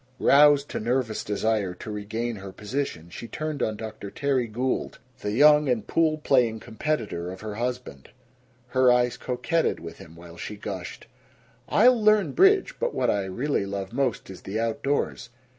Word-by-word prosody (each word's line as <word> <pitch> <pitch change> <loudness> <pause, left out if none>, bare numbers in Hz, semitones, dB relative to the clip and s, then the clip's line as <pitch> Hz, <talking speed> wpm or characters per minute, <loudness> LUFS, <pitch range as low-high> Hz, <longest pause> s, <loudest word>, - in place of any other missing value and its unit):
Roused 145 0 +5
to - - -3
nervous 120 -1 -1
desire 105 -3 -1
to 105 - -8
regain 110 +3 -4
her 95 0 -8
position 105 - -4
she 115 - -8
turned 155 0 -4
on 110 -1 -1
Dr. 110 -2 -7
Terry 135 0 0
Gould, 125 +4 -2 0.2
the 105 - -3
young 150 +4 +5
and 115 -4 0
pool 160 -2 +1
playing 125 -7 +2
competitor 110 - -3
of 95 - -9
her 110 -1 -5
husband. 120 - -5 0.6
Her 130 -1 +4
eyes 125 0 +2
coquetted 145 +6 -1
with 85 0 -9
him 80 0 -13
while 85 0 -13
she 105 - -6
gushed: 95 -3 -7 0.6
"I'll 240 +2 +5
learn 215 -2 +4
bridge. 390 +1 +4
But - - -1
what - - +2
I 100 -2 -1
really 100 +2 -1
love 100 +1 -5
most 125 -6 -1
is 95 - -11
the 105 +3 -4
outdoors. 120 +3 -1
115 Hz, 165 wpm, -25 LUFS, 100-140 Hz, 0.6 s, Roused